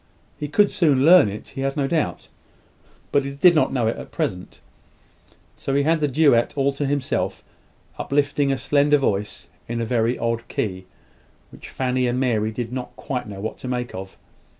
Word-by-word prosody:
He 150 - -3
could 205 +8 +3
soon 145 -6 +3
learn 175 - +7
it, 105 +2 -8
he 135 0 -6
had 135 +2 -2
no 140 - +1
doubt, 150 - -1 0.8
but 140 - +3
he 140 0 -6
did 175 +5 +6
not 155 - +2
know 125 -4 0
it 110 - 0
at - - -9
present: 90 0 -4 1.0
so 135 - -3
he 140 - +3
had 160 +2 +2
the 150 - +1
duet 140 -3 +3
all 140 0 +2
to 140 0 -2
himself; 140 -1 -2 0.6
uplifting 140 0 +1
a 135 - 0
slender 145 +3 +3
voice 105 -7 -2 0.2
in 120 0 -3
a 115 - -1
very 115 +1 +1
odd 115 0 -2
key, 95 -3 -3 0.6
which - - -12
Fanny 130 -1 0
and 120 +1 0
Mary 110 -5 +1
did 115 +1 -5
not 125 -1 -5
quite 130 -5 -4
know 100 -2 -8
what 110 - -5
to - - -7
make 125 -1 -3
of. 95 +1 -8
130 Hz, 190 wpm, -22 LUFS, 115-145 Hz, 1.0 s, learn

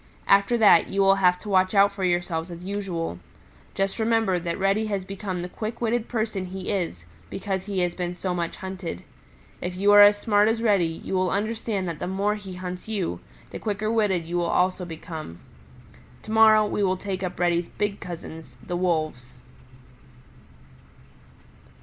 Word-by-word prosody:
After 200 +4 +4
that 205 -7 +6
you 195 - -3
will 195 0 +5
have 180 -1 +4
to 210 - -8
watch 185 0 +2
out 200 0 +6
for 200 -1 -6
yourselves 175 -2 0
as 175 +1 -9
usual. 185 - -3 0.6
Just 195 +3 -1
remember 220 -5 +2
that 170 0 -3
Reddy 200 +3 +1
has 200 -3 -2
become 190 -2 -5
the - - -4
quick 215 +5 -6
witted 235 0 0
person 215 -5 -2
he 190 +1 -5
is 170 - -3 0.2
because 190 0 -4
he 195 -2 -1
has 175 -1 0
been 180 -1 -4
so 180 0 -3
much 170 -1 -3
hunted. 190 - -6 0.6
If 180 0 -4
you 200 +2 +3
are 205 0 +9
as 205 0 +8
smart 205 -1 +3
as 225 +1 +1
Reddy, 200 -6 +3 0.2
you - - -5
will 185 -1 +1
understand 210 -1 -2
that 165 -3 -5
the - - -3
more 200 +3 0
he 200 -3 -8
hunts 180 +1 -6
you, 190 - -2 0.3
the - - -6
quicker 215 +1 -2
witted 205 -7 +1
you 175 +1 -1
also 180 +2 +1
will - - -11
become. 160 - -7 0.9
To 215 - -8
morrow 220 -1 +6
we 210 - -2
will 190 -1 +1
take 190 -1 -4
up 180 -2 -4
Reddy's 175 -1 +1
big 205 -1 -2
cousins, 165 -2 -9
the 175 - -3
Wolves." 155 -8 -1
190 Hz, 180 wpm, -25 LUFS, 175-205 Hz, 0.9 s, are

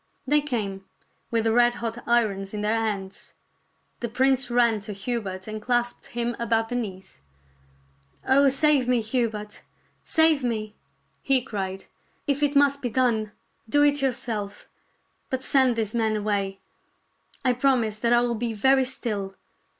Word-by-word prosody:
They 295 +2 +3
came, 210 -9 -3 0.5
with 230 -1 +1
the 225 0 +2
red 240 0 +4
hot 230 0 -4
irons 210 -4 +1
in 210 - -3
their 215 +2 +1
hands. 200 -4 -4 0.6
The 235 - -3
prince 265 +2 +2
ran 240 -2 +3
to 205 +1 -7
Hubert 195 -2 -4
and 215 0 -5
clasped 240 +1 -1
him 240 0 -2
about 225 -1 0
the 245 - -3
knees. 190 - -6 0.5
" 70 0 -30
Oh, 275 +1 +5
save 275 -1 +3
me, 250 -2 +2
Hubert! 220 -2 -3 0.4
save 320 -3 +3
me! 215 -3 -2 0.3
" - - -43
he 270 -1 +6
cried. 195 -5 -5 0.2
" - - -40
If 285 0 0
it 290 0 +2
must 280 0 +4
be 245 - -2
done, 225 -3 +1 0.4
do 290 +5 +4
it 290 -1 +3
yourself; 230 -6 -3 0.6
but 260 -2 -2
send 260 -3 +3
these 220 -2 -2
men 220 -2 +1
away. 200 -2 -1 0.9
I 255 - +4
promise 245 -5 +1
that 235 +1 +1
I 240 0 +5
will 240 -1 0
be 230 0 -2
very 265 +5 +3
still. 210 -7 -4
235 Hz, 160 wpm, -25 LUFS, 210-255 Hz, 0.9 s, he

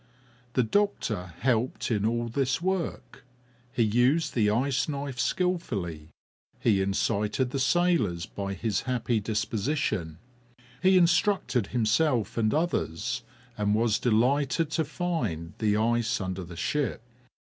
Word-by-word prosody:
The 125 - +3
doctor 110 - -1
helped 125 -1 0
in 105 -1 +1
all 120 +1 -1
this 130 +1 0
work; 185 -1 -3 0.5
he 120 - +1
used 125 +9 +2
the 105 -4 +3
ice 130 +6 +1
knife 140 -3 -4
skilfully; 120 - -1 0.5
he 100 -4 +3
incited 105 +5 0
the 135 - -2
sailors 165 - +2
by 100 -1 -5
his 105 +2 -1
happy 120 -2 +1
disposition. 105 - -1 0.6
He 190 0 +5
instructed 170 - +2
himself 120 - +1
and 110 -2 +1
others, 125 - -1 0.3
and 105 -1 +1
was 110 -1 +2
delighted 135 +6 +2
to 160 0 0
find 120 - -3
the 105 -2 +2
ice 120 +2 +1
under 95 -1 -4
the 85 0 -10
ship. 140 - -1
120 Hz, 125 wpm, -27 LUFS, 105-145 Hz, 0.6 s, He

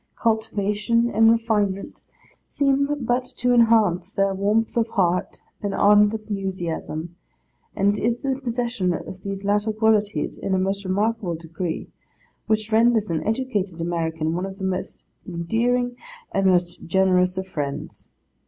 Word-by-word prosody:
Cultivation 220 +1 0
and 225 0 +5
refinement 210 -4 0 0.5
seem 280 0 +1 0.2
but 245 +2 +1
to 245 +1 +2
enhance 215 -6 +3
their 195 0 +2
warmth 210 +4 0
of 230 -1 +2
heart 180 -5 0 0.2
and 205 -1 -2
ardent 205 0 +5
enthusiasm; 185 -6 -4 0.6
and 200 +1 +2
it - - -5
is 235 +1 0
the 270 -1 -1
possession 235 -7 -1
of 185 - -8
these 195 0 -5
latter 205 +2 +1
qualities 215 -1 +1
in 190 - -1
a - - +2
most 195 +2 -1
remarkable 200 -1 0
degree, 165 +1 -5 0.6
which 215 0 0
renders 225 -3 +3
an 160 - -1
educated 215 -7 -1
American 165 -1 -1
one 180 +3 -2
of 195 0 -9
the 195 - -7
most 190 0 -3 0.2
endearing 235 +8 0 0.4
and 195 0 +2
most 175 -2 +1
generous 185 0 +3
of 190 - -2
friends. 145 -6 -5
200 Hz, 140 wpm, -23 LUFS, 185-225 Hz, 0.6 s, and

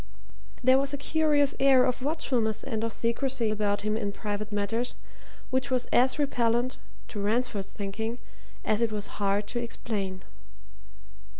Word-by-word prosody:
There 260 +1 +6
was 275 +1 -1
a - - -6
curious 295 -1 +3
air 270 -2 +6
of 255 0 -1
watchfulness 250 -7 0
and 225 -4 -2
of 230 - -1
secrecy 235 0 0
about 205 -1 0
him 215 +1 0
in 205 -2 -1
private 210 0 -4
matters 210 +4 -1 0.6
which 260 +1 0
was 255 -2 +1
as 255 +1 +4
repellent 245 -3 +1 0.3
to 205 - -4
Ransford's 210 -2 0
thinking 220 +4 -4 0.5
as 215 +1 +1
it 230 -2 +2
was 210 0 -5
hard 200 +1 +1
to 240 - -1
explain. 200 -5 -4
230 Hz, 145 wpm, -28 LUFS, 210-260 Hz, 0.6 s, There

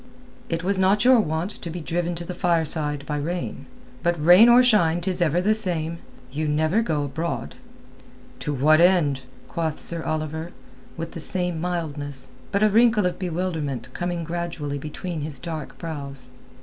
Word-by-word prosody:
"It 165 0 -2
was 195 +1 +1
not 195 +4 +3
your 255 -1 +7
wont 165 0 -1
to 170 - -5
be 175 +2 -5
driven 170 +2 -2
to 170 +1 -6
the 180 - -5
fireside 155 -4 0
by 150 0 -3
rain. 155 -3 -4 0.3
But 170 -1 0
rain 180 +9 +7
or 245 +1 +7
shine 175 -9 +3
'tis 180 0 -2
ever 170 +2 +2
the 215 +2 +3
same. 170 -6 -2 0.3
You 155 +3 -2
never 155 +8 +2
go 155 -10 -1
abroad." 145 - -4 0.9
"To 150 - -3
what 150 +4 +4
end?" 170 -7 +3 0.3
quoth 160 -3 -3
Sir 170 -1 +1
Oliver, 155 +2 -4 0.4
with 165 0 -5
the - - -7
same 180 -1 +3
mildness, 145 -6 -4 0.2
but 200 +1 +1
a 215 - +5
wrinkle 220 -1 +4
of 180 - -2
bewilderment 160 - -3
coming 175 -1 -3
gradually 165 -4 -4
between 155 +3 -5
his 145 -1 -4
dark 160 -1 -6
brows. 140 -6 -7
165 Hz, 165 wpm, -24 LUFS, 150-180 Hz, 0.9 s, your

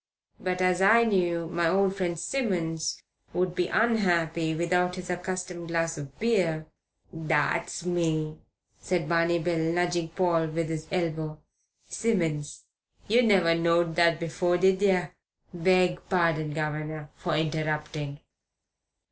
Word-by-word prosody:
But 185 0 -1
as 185 0 +2
I 220 +4 +6
knew 175 -6 +1
my 170 0 0
old 195 +1 +2
friend 175 -3 -2
Simmons 170 -6 -2 0.3
would 180 0 0
be 180 -1 0
unhappy 170 -8 +1
without 180 +2 +1
his 180 -1 -5
accustomed 180 -1 -4
glass 165 0 -1
of 140 -2 -9
beer 180 -9 +1 0.3
" - - -39
"That's 160 +1 -1
me," 160 -3 -1 0.4
said 180 -2 -1
Barney 170 +1 +2
Bill, 170 0 -1
nudging 170 +1 0
Paul 165 -1 +1
with 160 +1 -2
his 160 -1 -4
elbow. 160 -4 -2 0.5
"Simmons. 165 -10 -2 0.4
You 235 +4 +4
never 190 -8 +4
knowed 170 0 +2
that 170 -1 +3
afore, 175 +2 0
did 190 +1 +3
yer? 180 -3 +2 0.4
Beg 180 0 +2
pardon, 165 -4 +1
guv'nor, 155 0 -4
for 170 -4 -2
interrupting." 155 -2 -2
170 Hz, 130 wpm, -27 LUFS, 160-180 Hz, 0.5 s, I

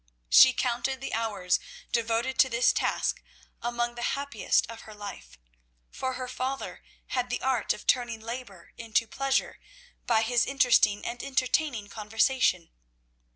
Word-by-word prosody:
She 260 - +9
counted 255 +1 -1
the 270 - -5
hours 205 -5 0 0.3
devoted 235 +2 0
to 260 - +6
this 235 0 +3
task - - 0 0.4
among 240 0 -1
the 240 - -8 0.2
happiest 280 0 0
of 230 0 -9
her 215 - -12
life, 200 - -9 0.5
for 260 0 -3
her 255 0 -5
father 260 +2 -4 0.3
had 250 -1 -1
the 245 - -3
art 260 -4 +1
of - - -4
turning 240 -3 +1
labour 225 -6 -8
into 230 0 +1
pleasure 270 +4 -1 0.5
by 225 -2 +3
his 240 +1 +2
interesting 245 -6 +3
and 240 +1 -4
entertaining 265 -3 0
conversation. 220 -4 +1
240 Hz, 140 wpm, -28 LUFS, 220-260 Hz, 0.5 s, She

